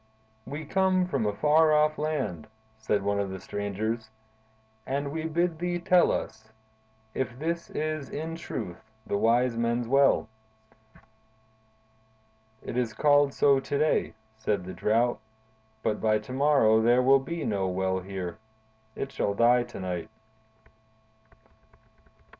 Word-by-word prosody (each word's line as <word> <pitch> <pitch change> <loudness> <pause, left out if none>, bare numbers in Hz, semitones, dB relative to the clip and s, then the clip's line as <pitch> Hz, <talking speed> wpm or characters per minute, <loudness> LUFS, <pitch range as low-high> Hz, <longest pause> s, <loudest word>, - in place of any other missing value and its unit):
"We 145 +3 -6
come 185 +2 +2
from 135 -11 -1
a - - +1
far 155 +5 +4
off 150 0 +2
land," 150 - -2 0.3
said 105 -2 0
one 100 0 0
of 100 -1 -1
the 95 0 -6
strangers, 105 +4 -3 0.7
"and 140 +3 -3
we 160 +1 -4
bid 165 0 0
thee 175 0 -1
tell 175 0 +4
us 110 0 -5 0.6
if 130 -2 -3
this 170 +4 -3
is 155 -2 -3
in 160 +2 -5
truth 95 - -6 0.2
the - - -2
Wise 120 +2 +2
Men's 115 +1 0
Well?" 135 0 +3 2.4
"It 120 - -5
is 120 -3 0
called 145 -1 +4
so 140 -1 +4
to 135 +1 -3
day," 155 -6 +1 0.2
said 105 -4 -1
the 95 - -7
Drought, 115 +3 +1 0.6
"but 105 - -1
by 110 -1 +3
to 105 +4 -8
morrow 130 -6 +4
there 120 +2 +4
will 135 +1 +6
be 165 +5 -5
no 100 -3 0
well 95 0 -1
here. 95 -1 -6 0.6
It 135 - -4
shall 100 - -1
die 120 +3 +4
to 120 - -10
night." 90 -1 -4
125 Hz, 135 wpm, -27 LUFS, 105-150 Hz, 2.4 s, will